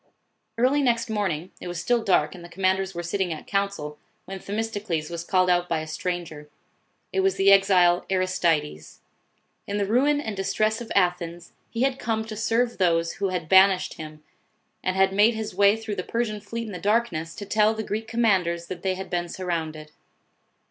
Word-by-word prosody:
Early 260 +5 +3
next 235 -4 +1
morning 185 -5 -2
it - - -6
was 175 -1 -4
still 240 +2 +1
dark, 175 -7 +2
and 180 -2 -11
the 175 - -11
commanders 190 +1 0
were 175 - -4
sitting 180 +1 -1
at 155 - -6
council, 195 -7 -2 0.3
when 190 0 -7
Themis 220 +4 -3
tocles 170 -7 -3
was 170 -1 -4
called 185 +1 +2
out 180 0 +2
by 165 - +1
a - - -5
stranger. 155 -2 -5 0.6
It - - +1
was 385 0 +2
the 195 +1 +4
exile 185 -3 +4
Aristides. 170 - -1 0.7
In 205 - -2
the 200 - +1
ruin 270 +8 +2
and 220 -7 -4
distress 215 +3 0
of 235 - -8
Athens, 175 -2 0 0.2
he 230 +1 -1
had 270 0 0
come 220 -1 -1
to 220 -1 -7
serve 230 +2 0
those, 170 -2 +2
who 200 -1 0
had 180 -3 -3
banished 190 +1 +5
him, 155 -1 -10 0.6
and 185 - -1
had 190 0 +3
made 210 +4 +4
his 220 -1 -4
way 200 +1 +4
through 220 -2 -5
the 180 - -2
Persian 215 -2 -2
fleet 230 +3 -5
in 215 - -7
the 180 - -5
darkness, 200 -7 0
to 205 - -7
tell 215 +2 +2
the 220 - -3
Greek 220 +2 -4
commanders, 190 -7 +1
that 180 -2 -6
they 190 -1 0
had 190 +1 -6
been 175 -1 -1
surrounded. 160 -4 -4
190 Hz, 195 wpm, -25 LUFS, 175-220 Hz, 0.7 s, banished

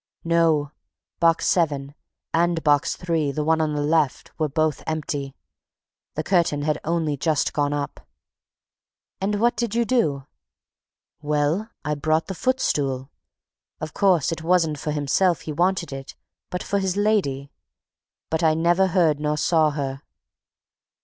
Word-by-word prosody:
"No; 165 -3 +2 0.5
Box 165 -1 +3
Seven, 145 -5 +1 0.4
and 170 0 +1
Box 145 -2 +3
Three, 165 -5 -1
the 150 +2 -2
one 160 +1 +2
on 150 -1 0
the 145 - -1
left, 150 -2 +1
were 155 -1 +1
both 155 +1 0
empty. 145 -3 -3 0.8
The 155 - -2
curtain 170 -6 +1
had 150 0 0
only 160 -2 0
just 150 +1 0
gone 145 -1 +1
up." 145 -1 -4 1.1
"And 205 +1 0
what 235 +2 +3
did 230 -1 -2
you 235 0 +2
do?" 150 - +1 1.0
"Well, 150 +8 0 0.2
I 150 - 0
brought 155 +2 0
the 190 - -5
footstool. 145 - -1 0.7
Of 155 0 -6
course, 180 -8 +3
it 165 - -4
wasn't 165 -3 +2
for 150 - -4
himself 150 +4 +1
he 155 - -5
wanted 175 -2 0
it, 135 0 -8 0.3
but 180 - -4
for 200 - 0
his 190 0 -1
lady! 185 -11 0 0.8
But 160 - 0
I 160 -2 +3
never 175 +4 +3
heard 170 -5 +3
her - - -11
nor 150 0 0
saw 160 -1 +3
her." 140 -2 -4
155 Hz, 150 wpm, -23 LUFS, 145-175 Hz, 1.1 s, Box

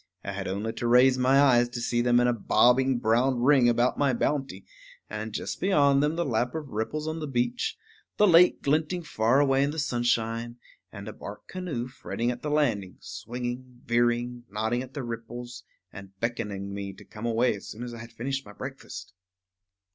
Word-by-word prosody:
I 100 - -4
had 100 0 -5
only 105 +4 -3
to 120 - -3
raise 125 +2 +5
my 130 +2 +4
eyes 120 -4 +5
to 120 0 -5
see 120 0 0
them 120 0 +4
in 120 - +3
a 120 - +3
bobbing 125 +3 +3
brown 120 +3 +2
ring 130 -3 +5
about 120 +1 +1
my 140 -2 +3
bounty; 135 -8 -2 0.5
and, 110 +1 -4
just - - -4
beyond 140 -7 +4
them, 150 +2 +1
the 170 0 -1
lap 120 +1 -1
of 155 -3 -5
ripples 130 +8 -3
on 160 +1 -3
the 155 - -4
beach, 120 -2 -1 0.4
the 210 - +5
lake 180 -1 +5
glinting 155 +5 0
far 120 -2 +2
away 135 -1 +3
in 140 - +2
the 155 - -5
sunshine, 120 -4 -1 0.3
and 100 -1 -9
a 110 - -6
bark 105 +1 -10
canoe 170 -10 -4
fretting 120 -2 -3
at 120 - -7
the 150 - -3
landing, 115 -11 0
swinging, 125 +1 -6
veering, 120 +1 +1
nodding 110 +4 -1
at 130 +1 -10
the 140 - -3
ripples, 120 +1 -7 0.3
and 95 -1 -12
beckoning 105 -4 -3
me 100 -1 -5
to 95 - -15
come 115 +2 -6
away 115 +1 +2
as 100 - -10
soon 115 - -7
as 120 -1 -6
I 115 - -8
had 115 +1 -10
finished 135 +4 -3
my 105 - -13
breakfast. - - -8
120 Hz, 195 wpm, -27 LUFS, 115-135 Hz, 0.5 s, raise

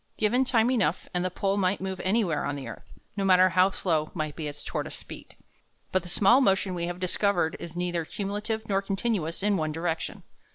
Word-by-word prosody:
Given 245 +5 +2
time 240 -1 +3
enough, 195 -9 +1
and 180 0 +1
the 185 - 0
pole 195 +2 -1
might 190 0 +1
move 190 -1 -4
anywhere 190 -6 +1
on 145 - -2
the 135 -3 -6
earth, 115 - -10 0.2
no 200 - -1
matter 185 -1 +6
how 185 +2 +4
slow 160 -5 -1
might 155 -3 -3
be 155 -2 -4
its 145 0 -7
tortoise - - -4
speed. - - -9 0.6
But 185 - +2
the 175 - -9
small 215 +9 +5
motion 195 -4 +2
we 170 -1 -2
have 175 0 -5
discovered 185 -2 +1
is 170 -1 -8
neither 175 -1 -1
cumulative 210 +5 -4
nor 195 -1 +1
continuous 195 -4 -2
in 205 -1 +2
one 155 -2 -1
direction. 165 +1 -3
185 Hz, 205 wpm, -27 LUFS, 170-200 Hz, 0.6 s, matter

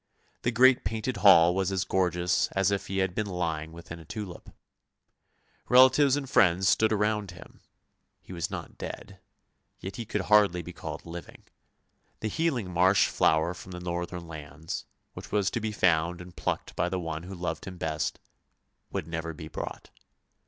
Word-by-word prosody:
The - - +1
great 125 +2 +5
painted 110 +2 -2
hall 90 -4 +7
was 95 0 0
as 95 -1 0
gorgeous 90 -1 +1
as 95 0 +2
if 100 - -2
he 95 - -3
had 95 -2 +1
been 105 +2 -2
lying 80 -4 -3
within 85 0 -9
a - - -11
tulip. 95 +1 -7 1.2
Relatives 130 +2 +6
and 145 -2 -3
friends 95 -6 +4
stood 110 +2 +4
around 105 -1 0
him 90 0 -13 0.3
— - - -50
he - - -10
was 85 -2 -3
not - - -7
dead - - -7 0.3
— - - -48
yet 95 - -7
he 115 - -4
could 105 -1 -2
hardly 100 -3 +4
be 90 - -9
called - - -7
living. 85 0 -9 0.8
The 110 - -1
healing 125 - -1
marsh 95 +3 +4
flower 80 +2 +2
from 90 +1 -10
the 90 - -6
northern 85 0 -4
lands, 80 0 -7 0.3
which - - -10
was 100 -2 +1
to - - -1
be 110 -1 -2
found 85 -3 +2
and 90 0 -11
plucked - - -3
by 90 - 0
the 95 - -2
one 80 -2 -4
who 95 +3 -8
loved 90 0 -4
him 95 -2 -8
best, 80 -2 -2 0.7
would - - -3
never 80 0 -4
be 80 -1 -9
brought. - - -7
90 Hz, 180 wpm, -28 LUFS, 85-105 Hz, 1.2 s, hall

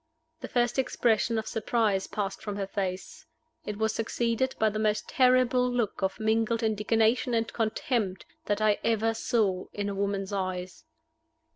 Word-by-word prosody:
The - - -6
first 240 +1 +1
expression 230 -3 +1
of 220 - -2
surprise 220 -3 0
passed 195 -2 -3
from 205 -2 -4
her 200 -1 -2
face. 195 +10 -4 0.4
It 210 -1 -3
was 220 0 +1
succeeded 235 +3 -1
by 220 -1 +2
the 215 - -3
most 215 0 0
terrible 255 -1 +3
look 235 -5 -1
of 190 +2 -1
mingled 225 +1 +1
indignation 225 +3 +2
and 225 0 -1
contempt 215 -3 -1 0.2
that 205 +1 0
I 210 -1 +3
ever 225 0 +2
saw 205 -5 0
in 205 0 -2
a - - -3
woman's 200 0 -2
eyes. 185 - -4
220 Hz, 155 wpm, -28 LUFS, 200-235 Hz, 0.4 s, terrible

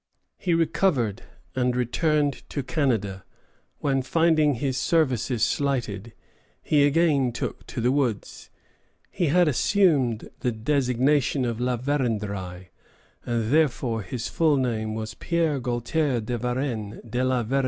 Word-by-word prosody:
He 175 -3 +1
recovered, 150 - +1 0.3
and 125 -1 +1
returned 145 +3 +1
to 140 - -3
Canada, 110 - -1 0.6
when, 135 -2 +1
finding 155 +1 +3
his 130 +2 -2
services 130 -6 +1
slighted, 120 -6 -1 0.5
he 145 -2 +4
again 145 -4 +2
took - - -5
to - - -5
the 120 +2 +2
woods. 130 -7 -2 0.6
He 175 - 0
had 175 +3 +4
assumed 145 - +2
the 125 - 0
designation 130 +3 +1
of 115 -1 -2
La 125 0 0
Vérendrye, 105 -9 -2 0.6
and 115 -1 -1
thenceforth 125 - +1
his 115 +3 -4
full 155 -3 +2
name 110 -4 -1
was 110 0 -5
Pierre 165 -1 0
Gaultier 125 +3 0
de 115 +2 -3
Varennes 120 -3 -3
de 120 +3 -1
la 130 -2 +1
Vérendrye. 135 +5 0
125 Hz, 130 wpm, -25 LUFS, 115-145 Hz, 0.6 s, he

